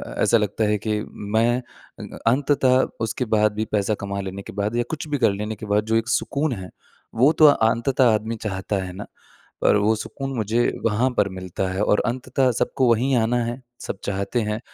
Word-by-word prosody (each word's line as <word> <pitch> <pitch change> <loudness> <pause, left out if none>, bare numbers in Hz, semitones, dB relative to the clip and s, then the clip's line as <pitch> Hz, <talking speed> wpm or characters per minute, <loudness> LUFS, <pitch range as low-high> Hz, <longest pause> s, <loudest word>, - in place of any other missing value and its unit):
अ, - - -3
ऐसा 115 - +4
लगता 105 +1 -1
है 105 0 +2
कि 105 -1 +1
मैं 110 +4 +1 0.4
अ, - - -8
अंततः 130 0 +3 0.2
उसके 115 +3 -2
बाद 105 0 +3
भी, 110 +1 -2
पैसा 105 0 +1
कमा 100 0 -3
लेने 95 0 -6
के - - -10
बाद 105 +3 -1
या 120 - +2
कुछ 155 -1 -4
भी 145 - 0
कर - - +5
लेने 105 +2 -4
के 110 - -9
बाद 105 +1 +1
जो 110 +1 0
एक 115 0 +1
सुकून 140 +3 0
है, 95 -4 -7 0.5
वो 130 +6 +5
तो 155 - +5
अंततः 120 -1 +3
आदमी 110 +2 -1
चाहता 95 +1 -3
है 90 -1 -7
ना। 100 +3 -7 0.6
पर - - +4
वो 105 +2 +3
सुकून 135 +5 -5
मुझे 110 +2 +1 0.2
वहाँ 115 +4 +2
पर 100 - +3
मिलता 95 0 -4
है 95 +2 -1
और 105 - +3
अंततः 130 +2 0
सबको 125 +2 +1
वही 120 +4 +2
आना 115 +1 +1
है, 120 +3 -4 0.2
सब 100 - -5
चाहते 100 +4 -1
हैं। 105 +1 -2
110 Hz, 210 wpm, -23 LUFS, 105-125 Hz, 0.6 s, कर